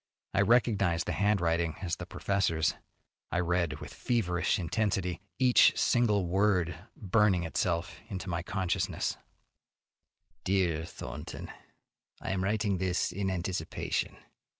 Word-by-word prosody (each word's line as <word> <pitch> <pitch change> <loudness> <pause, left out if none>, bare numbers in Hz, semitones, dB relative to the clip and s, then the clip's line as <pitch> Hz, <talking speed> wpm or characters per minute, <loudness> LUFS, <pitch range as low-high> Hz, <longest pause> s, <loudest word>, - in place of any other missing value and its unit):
I 100 - +3
recognized 100 -6 +3
the - - -2
handwriting 85 -5 +1
as 85 -2 -1
the - - -7
professor's. 85 -5 +1 0.6
I 85 - +1
read 85 -1 +1
with - - -9
feverish 90 -8 0
intensity, 90 -1 -1 0.2
each 125 -2 +5
single 105 -6 +3
word 90 -1 +2 0.2
burning 100 -3 +2
itself 85 0 -1
into 95 -1 -5
my 85 -1 -1
consciousness: 90 0 -1 1.3
Dear 90 -4 +1
Thornton: - - -7 0.7
I - - -4
am 95 -1 -1
writing 100 -1 0
this 90 -2 0
in 95 0 -2
anticipation. 90 -2 -2
95 Hz, 115 wpm, -30 LUFS, 85-100 Hz, 1.3 s, each